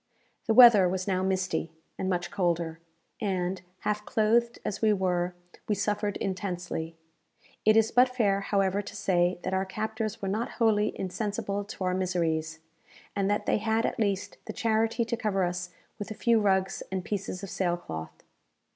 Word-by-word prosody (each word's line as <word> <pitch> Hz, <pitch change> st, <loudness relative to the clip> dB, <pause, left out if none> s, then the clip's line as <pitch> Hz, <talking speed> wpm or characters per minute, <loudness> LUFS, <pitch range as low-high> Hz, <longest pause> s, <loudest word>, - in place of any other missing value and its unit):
The 220 Hz, -, +3 dB
weather 225 Hz, -7 st, +9 dB
was 185 Hz, +1 st, -2 dB
now 185 Hz, -1 st, +1 dB
misty, 185 Hz, -3 st, -1 dB, 0.2 s
and 190 Hz, -, -2 dB
much 175 Hz, -2 st, -1 dB
colder; 170 Hz, -3 st, -1 dB, 0.4 s
and, 185 Hz, -2 st, -1 dB, 0.2 s
half 210 Hz, 0 st, -1 dB
clothed 230 Hz, +3 st, +2 dB
as 200 Hz, -, -3 dB
we 220 Hz, -1 st, +4 dB
were, 180 Hz, -2 st, 0 dB, 0.3 s
we 210 Hz, -, +1 dB
suffered 205 Hz, 0 st, -1 dB
intensely. 180 Hz, -4 st, -3 dB, 0.7 s
It 215 Hz, +1 st, +6 dB
is 225 Hz, 0 st, +4 dB
but 250 Hz, +1 st, +5 dB
fair, 205 Hz, -6 st, +1 dB
however, 195 Hz, 0 st, +1 dB
to 205 Hz, -, -10 dB
say 175 Hz, -3 st, +1 dB
that 185 Hz, -, -2 dB
our 190 Hz, 0 st, +1 dB
captors 220 Hz, +2 st, -3 dB
were 195 Hz, -, -4 dB
not 215 Hz, +5 st, -2 dB
wholly 215 Hz, -2 st, +2 dB
insensible 200 Hz, +1 st, -2 dB
to 200 Hz, -, -7 dB
our 185 Hz, 0 st, +1 dB
miseries, 165 Hz, -4 st, -1 dB, 0.5 s
and 200 Hz, -1 st, +1 dB
that 205 Hz, -, 0 dB
they -, -, +2 dB
had 220 Hz, +1 st, +1 dB
at -, -, -2 dB
least 200 Hz, -3 st, -1 dB
the -, -, -5 dB
charity 225 Hz, +1 st, +1 dB
to 235 Hz, -, -1 dB
cover 210 Hz, -5 st, 0 dB
us 180 Hz, 0 st, -2 dB, 0.3 s
with 205 Hz, -, -5 dB
a 215 Hz, -, -5 dB
few 235 Hz, 0 st, +3 dB
rugs 190 Hz, -2 st, +1 dB
and 190 Hz, -1 st, -3 dB
pieces 195 Hz, -2 st, -4 dB
of 195 Hz, -, -6 dB
sail 175 Hz, -2 st, 0 dB
cloth. 80 Hz, -, -8 dB
195 Hz, 175 wpm, -28 LUFS, 180-215 Hz, 0.7 s, weather